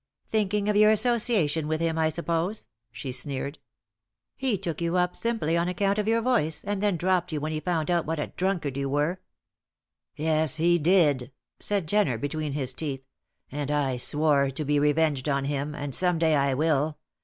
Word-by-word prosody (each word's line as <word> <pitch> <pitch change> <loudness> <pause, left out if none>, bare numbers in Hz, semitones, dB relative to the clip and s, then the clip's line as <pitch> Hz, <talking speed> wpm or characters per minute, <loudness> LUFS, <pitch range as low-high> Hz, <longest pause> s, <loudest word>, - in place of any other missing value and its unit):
"Thinking 210 -1 +1
of 210 - +1
your 215 +1 +6
association 215 - +2
with 155 0 -1
him, 165 -1 0
I 160 0 +3
suppose?" 170 +5 -2 0.3
she 130 +3 -6
sneered. 140 +3 -4 0.8
"He 255 -6 0
took 175 -3 -4
you 170 +1 0
up 180 0 +1
simply 225 -9 -1
on 170 +1 +1
account 195 +3 0
of 210 - -1
your 230 0 +2
voice, 195 -11 +1
and 205 -1 -2
then 205 -4 +1
dropped 180 0 +1
you 155 - -2
when 155 +2 -3
he 155 - -2
found 165 -1 -1
out 170 -3 +1
what 160 +1 -1
a 150 - -4
drunkard 175 -8 -1
you 140 0 -2
were." 150 +6 0 0.9
"Yes, 155 -1 +1
he 170 +2 +3
did," 150 -6 +3 0.3
said 200 -4 0
Jenner, 190 - +1
between 145 +3 -3
his 135 -3 -1
teeth. 135 -2 -4 0.5
"And 145 +1 -3
I 140 -4 0
swore 145 +1 +2
to 140 +3 -5
be 145 +1 +2
revenged 150 -1 +1
on 140 -1 0
him; 145 +1 -2
and 145 -2 -5
some 180 +2 +2
day 160 -1 +3
I 140 -2 +2
will. 150 0 +1
160 Hz, 190 wpm, -26 LUFS, 145-185 Hz, 0.9 s, your